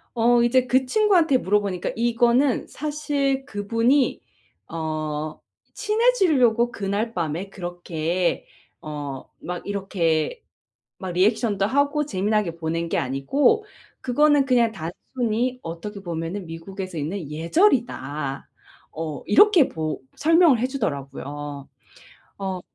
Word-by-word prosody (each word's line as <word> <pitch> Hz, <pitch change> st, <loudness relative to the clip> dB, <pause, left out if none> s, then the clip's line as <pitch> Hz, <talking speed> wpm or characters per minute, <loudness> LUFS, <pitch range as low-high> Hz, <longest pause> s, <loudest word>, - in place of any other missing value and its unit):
어 240 Hz, +1 st, +4 dB
이제 250 Hz, +1 st, +3 dB
그 260 Hz, +2 st, +3 dB
친구한테 350 Hz, -3 st, +3 dB
물어보니까 200 Hz, -5 st, 0 dB
"이거는 240 Hz, +3 st, +2 dB
사실 285 Hz, -2 st, -2 dB
그분이 230 Hz, +4 st, +1 dB, 0.5 s
어 155 Hz, -1 st, -4 dB, 0.3 s
친해지려고 340 Hz, -, +3 dB
그날 205 Hz, +2 st, -2 dB
밤에 170 Hz, +2 st, -3 dB
그렇게 175 Hz, -1 st, -2 dB, 0.4 s
어 145 Hz, -3 st, -6 dB, 0.2 s
막 180 Hz, 0 st, -6 dB
이렇게 190 Hz, -, -1 dB, 0.5 s
막 190 Hz, -2 st, -5 dB
리액션도 200 Hz, +2 st, +2 dB
하고 285 Hz, +4 st, +1 dB
재미나게 200 Hz, -, 0 dB
보낸 165 Hz, +1 st, -2 dB
게 -, -, 0 dB
아니고 270 Hz, -, +2 dB, 0.4 s
그거는 290 Hz, +3 st, +3 dB
그냥 240 Hz, -3 st, +3 dB
단순히 235 Hz, +8 st, -3 dB
어떻게 170 Hz, +5 st, -6 dB
보면은 170 Hz, +2 st, -4 dB
미국에서 185 Hz, +2 st, -7 dB
있는 160 Hz, +1 st, -4 dB
예절이다." 160 Hz, -, 0 dB, 0.4 s
어 155 Hz, -2 st, -5 dB
이렇게 345 Hz, -, +6 dB
보 155 Hz, -2 st, -4 dB, 0.2 s
설명을 325 Hz, -3 st, +5 dB
해 245 Hz, -, +1 dB
주더라고요. 145 Hz, -, -5 dB, 0.7 s
어. 190 Hz, -2 st, -3 dB
205 Hz, 250 characters per minute, -23 LUFS, 165-260 Hz, 0.7 s, 이렇게